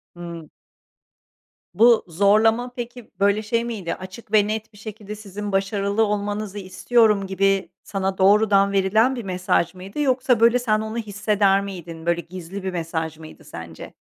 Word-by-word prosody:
Hımm. 170 -2 -8 1.2
Bu 230 +3 +5
zorlama 215 +7 +3
peki, 240 -1 -8
böyle, 200 +1 +3
şey 230 +2 -1
miydi? 210 -8 -4
Açık 190 +4 -11
ve 210 -1 +5
net 220 0 -4
bir - - -17
şekilde, 210 -1 -8
"Sizin 205 0 -7
başarılı 200 +2 0
olmanızı 205 0 -3
istiyorum." 210 +1 +2
gibi 195 0 +1
sana 195 -1 -3
doğrudan 200 0 +4
verilen 215 +6 +2
bir 240 - -5
mesaj 180 -2 0
mıydı 190 +9 -9
yoksa, 255 -3 +2
böyle, 235 +2 +5
sen 215 -3 +1
onu 220 +1 -5
hisseder 205 -2 +1
miydin, 170 -4 -8
böyle 170 0 +1
gizli 185 +2 -8
bir 190 - -2
mesaj 160 -2 -3
mıydı 160 0 -13
sence? 85 -1 -10
200 Hz, 150 wpm, -22 LUFS, 185-220 Hz, 1.2 s, Bu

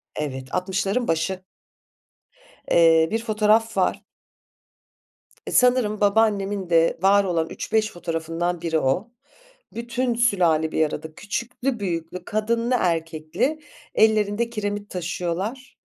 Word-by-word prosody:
Evet, 135 -3 -4
60'ların 195 +5 -1
başı. 180 +3 -1 1.3
Eee, 165 -1 +5
bir 225 +1 -1
fotoğraf 220 0 +2
var. - - +1 1.5
Sanırım 245 -4 +3
babaannemin 200 -2 +1
de 165 -1 +3
var 200 +1 +5
olan 165 -4 -1
3-5 215 0 -1
fotoğrafından 165 +1 -3
biri 160 -2 0
o. 165 - -1 0.6
Bütün 240 +1 -2
sülale 175 -9 +2
bir 160 - +2
arada 155 +1 -7
küçüklü 235 +5 -3
büyüklü, 175 -2 -4
kadınlı 230 +3 0
erkekli 165 - -1 0.4
ellerinde 215 +1 +2
kiremit 205 -2 -4
taşıyorlar. 180 +8 -4
200 Hz, 100 wpm, -23 LUFS, 165-225 Hz, 1.5 s, Eee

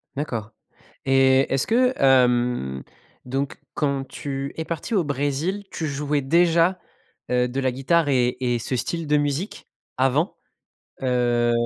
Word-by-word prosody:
D'accord 115 -7 -4 0.5
et 135 0 +4
est-ce 135 - +1
que, 250 +3 +3
hem, 125 - +3 0.4
donc, 135 +2 -3
quand 140 -2 -1
tu 140 0 -5
es 160 - -3
parti 170 +9 -4
au 190 - +3
Brésil, 145 +7 -1
tu 160 - -3
jouais 145 +1 -1
déjà, 170 +5 +3 0.5
heu, 125 0 +2
de 130 +2 -3
la 130 - +1
guitare 145 +5 +1
et 125 -2 +2
et 120 -2 +1
ce 130 - -3
style 165 +6 -3
de 150 0 +3
musique, 145 +7 -2 0.3
avant? 135 +6 +1 0.7
Heu, 120 -2 +2
135 Hz, 140 wpm, -23 LUFS, 125-155 Hz, 0.7 s, et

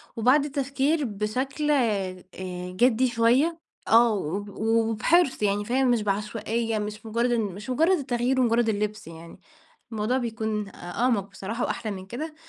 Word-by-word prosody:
وبعد 255 +6 +4
التفكير 280 +2 0
بشكل، 255 +8 -2
آآ، 200 -9 0 0.5
جِدّي 245 +4 +3
شوية، 250 +8 +2 0.3
آه، 230 0 +5
و 190 -2 -2 0.2
وبحِرص، 225 - +2
يعني 205 0 +1
فاهم، 255 +2 +2
مش 235 -2 +2
بعشوائية، 215 +2 -1
مش 210 +1 -6
مجرد 235 +2 0
إن 235 -1 +2
مش 205 +2 -6
مجرد 325 +9 +3
التغيير 260 -2 0
ومجرد 235 -1 +2
اللبس 210 0 -2
يعني، 165 0 -11 0.5
الموضوع 220 +3 0
بيكون 220 -4 -2
أ - - -17
أعمق، 200 +2 -1
بصراحة، 210 +5 -4
وأحلى 215 - -3
من 190 -2 -7
كده 300 +10 -6
230 Hz, 145 wpm, -26 LUFS, 210-255 Hz, 0.5 s, آه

